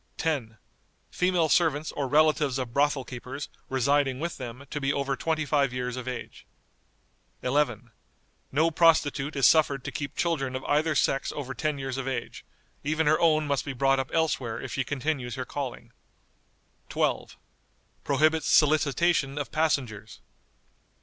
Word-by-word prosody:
"10. 130 Hz, -9 st, -2 dB, 0.5 s
Female 180 Hz, -3 st, +2 dB
servants 155 Hz, -1 st, +2 dB
or 140 Hz, -2 st, -3 dB
relatives 150 Hz, -1 st, +3 dB
of 125 Hz, -3 st, -4 dB
brothel 145 Hz, -1 st, +2 dB
keepers 130 Hz, +3 st, -7 dB, 0.2 s
residing 135 Hz, 0 st, +1 dB
with 170 Hz, +2 st, -3 dB
them 125 Hz, +2 st, -8 dB
to 150 Hz, -, -3 dB
be 135 Hz, 0 st, +1 dB
over 140 Hz, -1 st, -1 dB
twenty 155 Hz, +3 st, -1 dB
five 140 Hz, -3 st, +2 dB
years 125 Hz, 0 st, -3 dB
of 130 Hz, -1 st, -6 dB
age." 125 Hz, -2 st, -7 dB, 1.0 s
"11. 125 Hz, -3 st, 0 dB, 0.6 s
No 160 Hz, +4 st, +2 dB
prostitute 155 Hz, -3 st, +3 dB
is 135 Hz, -, +3 dB
suffered 145 Hz, -4 st, +4 dB
to -, -, -5 dB
keep 140 Hz, -1 st, -5 dB
children 135 Hz, -7 st, -1 dB
of 130 Hz, -, -4 dB
either 155 Hz, +2 st, +1 dB
sex 135 Hz, -, +1 dB
over 135 Hz, -3 st, -5 dB
ten 155 Hz, +1 st, -2 dB
years 135 Hz, -1 st, -4 dB
of 135 Hz, -, -4 dB
age; 130 Hz, -3 st, -4 dB, 0.4 s
even 155 Hz, +2 st, 0 dB
her 155 Hz, +1 st, +4 dB
own 155 Hz, -2 st, +3 dB
must 140 Hz, -2 st, 0 dB
be 140 Hz, -, -5 dB
brought 135 Hz, +1 st, +2 dB
up 130 Hz, -, -3 dB
elsewhere 145 Hz, -8 st, 0 dB
if 130 Hz, -, -7 dB
she 135 Hz, -, 0 dB
continues 135 Hz, -2 st, -2 dB
her 130 Hz, -1 st, -4 dB
calling." 125 Hz, -4 st, -6 dB, 1.0 s
12. -, -, -1 dB, 0.7 s
Prohibits 155 Hz, +3 st, +2 dB
solicitation 150 Hz, -1 st, +3 dB
of 145 Hz, -, -4 dB
passengers. 130 Hz, -9 st, -1 dB
140 Hz, 150 wpm, -27 LUFS, 130-155 Hz, 1.0 s, suffered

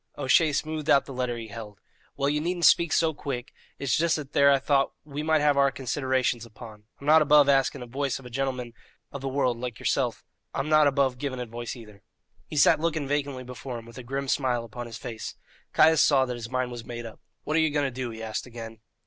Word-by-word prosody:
O'Shea 145 Hz, +3 st, +3 dB
smoothed 155 Hz, +1 st, -3 dB
out 140 Hz, -, +5 dB
the 135 Hz, -, -8 dB
letter 125 Hz, -1 st, -2 dB
he 115 Hz, -1 st, -7 dB
held. 105 Hz, -2 st, -9 dB, 0.4 s
"Well, 140 Hz, 0 st, +1 dB
you 150 Hz, +1 st, +1 dB
needn't 175 Hz, +1 st, 0 dB
speak 170 Hz, -2 st, +5 dB
so 160 Hz, -1 st, +2 dB
quick; 135 Hz, -3 st, -5 dB, 0.2 s
it's 140 Hz, -2 st, 0 dB
just 165 Hz, 0 st, +2 dB
that 150 Hz, -2 st, -6 dB
there 140 Hz, 0 st, +6 dB
I 140 Hz, -, +5 dB
thought 135 Hz, 0 st, +1 dB
we 145 Hz, 0 st, -5 dB
might 155 Hz, 0 st, +2 dB
have 145 Hz, -1 st, +3 dB
our 140 Hz, 0 st, +5 dB
considerations 130 Hz, -2 st, -1 dB
upon. 110 Hz, -2 st, -12 dB
I'm 140 Hz, -, -11 dB
not 155 Hz, +2 st, +6 dB
above 150 Hz, -1 st, +6 dB
asking 135 Hz, -2 st, +2 dB
advoice 135 Hz, +2 st, -2 dB
of 135 Hz, -, -13 dB
a 125 Hz, -, -10 dB
gintleman 130 Hz, -2 st, -3 dB, 0.4 s
of 140 Hz, -, -7 dB
the 135 Hz, -, -3 dB
world 130 Hz, -3 st, 0 dB
like 125 Hz, -2 st, -5 dB
yerself; -, -, -1 dB, 0.3 s
I'm 135 Hz, +3 st, -2 dB
not 155 Hz, -1 st, +6 dB
above 135 Hz, -3 st, +1 dB
giving 135 Hz, -2 st, -3 dB
advoice, 120 Hz, 0 st, -5 dB
neither." 105 Hz, -5 st, -13 dB, 0.5 s
He 150 Hz, -, -6 dB
sat 145 Hz, -, +5 dB
looking 160 Hz, -3 st, -1 dB
vacantly 140 Hz, -2 st, -2 dB
before 125 Hz, 0 st, -7 dB
him 115 Hz, -, -10 dB
with 115 Hz, +1 st, -11 dB
a -, -, -8 dB
grim 135 Hz, +3 st, -4 dB
smile 125 Hz, -4 st, 0 dB
upon 120 Hz, +1 st, -7 dB
his 115 Hz, -1 st, -8 dB
face. 115 Hz, -2 st, -7 dB, 0.4 s
Caius 160 Hz, 0 st, +5 dB
saw 135 Hz, -3 st, +4 dB
that 125 Hz, -, -4 dB
his 115 Hz, -1 st, -7 dB
mind 130 Hz, -1 st, -1 dB
was 120 Hz, -1 st, -7 dB
made 120 Hz, +1 st, -7 dB
up. 115 Hz, -, -10 dB, 0.2 s
"What 155 Hz, -, -2 dB
are -, -, +4 dB
you 160 Hz, -, +3 dB
going 145 Hz, -1 st, 0 dB
to 135 Hz, -, -1 dB
do?" 130 Hz, 0 st, -4 dB
he 110 Hz, -1 st, -8 dB
asked 110 Hz, +2 st, -4 dB
again. 115 Hz, -2 st, -9 dB
135 Hz, 235 wpm, -26 LUFS, 120-145 Hz, 0.5 s, there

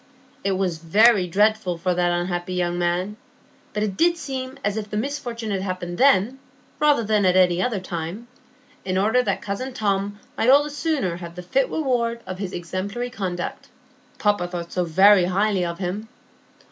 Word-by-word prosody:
It 195 Hz, 0 st, +1 dB
was 185 Hz, -4 st, -1 dB
very 200 Hz, +4 st, +4 dB
dreadful 205 Hz, -1 st, +2 dB
for 180 Hz, +2 st, 0 dB
that 175 Hz, 0 st, +1 dB
unhappy 175 Hz, +1 st, -2 dB
young 175 Hz, -1 st, -1 dB
man, 180 Hz, +4 st, -1 dB, 0.5 s
but 210 Hz, -, -1 dB
it 200 Hz, -3 st, -2 dB
did 340 Hz, 0 st, +3 dB
seem 265 Hz, -3 st, -5 dB
as 205 Hz, 0 st, 0 dB
if 215 Hz, -1 st, -4 dB
the 210 Hz, -, -3 dB
misfortune 240 Hz, -3 st, -3 dB
had 195 Hz, -1 st, -1 dB
happened 185 Hz, -2 st, -4 dB
then, 260 Hz, -1 st, +4 dB, 0.4 s
rather 295 Hz, -5 st, +4 dB
than 210 Hz, -1 st, +2 dB
at 185 Hz, -1 st, +3 dB
any 180 Hz, -1 st, +4 dB
other 230 Hz, -3 st, 0 dB
time, 180 Hz, +5 st, -5 dB, 0.6 s
in 185 Hz, 0 st, -1 dB
order 220 Hz, +6 st, +3 dB
that -, -, -2 dB
cousin 250 Hz, +7 st, -4 dB
Tom 200 Hz, 0 st, -1 dB, 0.2 s
might 230 Hz, -, +1 dB
all 280 Hz, +2 st, +7 dB
the 295 Hz, -, -6 dB
sooner 285 Hz, -, -1 dB
have 170 Hz, -1 st, -9 dB
the 180 Hz, -, -7 dB
fit 260 Hz, +9 st, +1 dB
reward 240 Hz, -6 st, -1 dB
of 185 Hz, 0 st, -6 dB
his 195 Hz, -3 st, -4 dB
exemplary 195 Hz, +8 st, -4 dB
conduct,—papa 190 Hz, 0 st, -4 dB
thought 175 Hz, -1 st, -6 dB
so 180 Hz, -1 st, 0 dB
very 190 Hz, +3 st, +6 dB
highly 195 Hz, +1 st, +1 dB
of 170 Hz, -1 st, -3 dB
him. 195 Hz, +4 st, -4 dB
195 Hz, 175 wpm, -23 LUFS, 180-235 Hz, 0.6 s, all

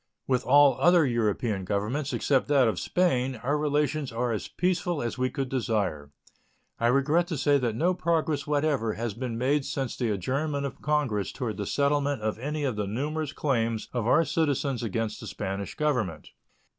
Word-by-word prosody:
With 130 Hz, -1 st, +1 dB
all 140 Hz, -1 st, +6 dB
other 175 Hz, -2 st, +5 dB
European 110 Hz, -4 st, 0 dB
Governments, 105 Hz, +9 st, -2 dB
except 135 Hz, -3 st, +1 dB
that 140 Hz, -4 st, +4 dB
of 110 Hz, -, 0 dB
Spain, 135 Hz, -8 st, +1 dB
our 140 Hz, +4 st, +1 dB
relations 150 Hz, -2 st, 0 dB
are 120 Hz, +1 st, -1 dB
as 110 Hz, -, -3 dB
peaceful 175 Hz, -2 st, -1 dB
as 120 Hz, 0 st, -3 dB
we 130 Hz, 0 st, +1 dB
could 135 Hz, -1 st, -3 dB
desire. 105 Hz, -, -1 dB, 0.7 s
I 115 Hz, -, +2 dB
regret 145 Hz, +7 st, +2 dB
to 165 Hz, -4 st, -3 dB
say 145 Hz, +1 st, +3 dB
that 120 Hz, -4 st, -1 dB
no 175 Hz, +9 st, +2 dB
progress 160 Hz, -4 st, 0 dB
whatever 145 Hz, -6 st, +1 dB
has 115 Hz, -1 st, -3 dB
been 120 Hz, 0 st, -4 dB
made 135 Hz, +4 st, +1 dB
since 135 Hz, -2 st, -3 dB
the 120 Hz, -3 st, -1 dB
adjournment 140 Hz, -, -1 dB
of 140 Hz, -, -6 dB
Congress 140 Hz, -10 st, 0 dB
toward 115 Hz, -4 st, -4 dB
the 100 Hz, -2 st, -3 dB
settlement 140 Hz, -3 st, +1 dB
of 110 Hz, 0 st, -2 dB
any 150 Hz, +4 st, -3 dB
of 130 Hz, -6 st, -1 dB
the 105 Hz, -1 st, -1 dB
numerous 145 Hz, +7 st, -2 dB
claims 115 Hz, -7 st, -1 dB
of 120 Hz, -3 st, -1 dB
our 165 Hz, +6 st, +4 dB
citizens 145 Hz, -5 st, 0 dB
against 110 Hz, -1 st, -2 dB
the -, -, -8 dB
Spanish 100 Hz, 0 st, -4 dB
Government. 120 Hz, -, -1 dB
130 Hz, 180 wpm, -27 LUFS, 115-150 Hz, 0.7 s, all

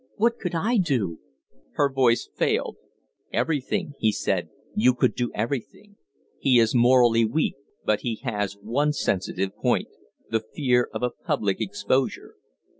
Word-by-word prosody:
What 235 Hz, +2 st, +1 dB
could 180 Hz, -3 st, -3 dB
I 220 Hz, +9 st, +1 dB
do?" 125 Hz, -, 0 dB, 0.5 s
Her 145 Hz, -, +3 dB
voice 130 Hz, -4 st, +2 dB
failed. -, -, 0 dB, 0.5 s
"Everything," 160 Hz, +3 st, -1 dB
he 110 Hz, -, +3 dB
said, -, -, -1 dB, 0.2 s
"you 125 Hz, +4 st, +3 dB
could -, -, +2 dB
do 120 Hz, -1 st, -1 dB
everything. 135 Hz, -, -4 dB, 0.4 s
He 130 Hz, -3 st, +4 dB
is 115 Hz, -1 st, +4 dB
morally 120 Hz, -2 st, +5 dB
weak, 130 Hz, +8 st, +1 dB, 0.3 s
but 105 Hz, -1 st, +2 dB
he 120 Hz, -2 st, -2 dB
has 105 Hz, -5 st, -2 dB
one 135 Hz, +9 st, 0 dB
sensitive 95 Hz, -6 st, -1 dB
point -, -, 0 dB, 0.4 s
the 115 Hz, -, 0 dB, 0.2 s
fear 125 Hz, -4 st, +2 dB
of -, -, -5 dB
a 125 Hz, -, +1 dB
public 100 Hz, -3 st, -2 dB
exposure. 105 Hz, +6 st, -1 dB
125 Hz, 140 wpm, -25 LUFS, 110-145 Hz, 0.5 s, morally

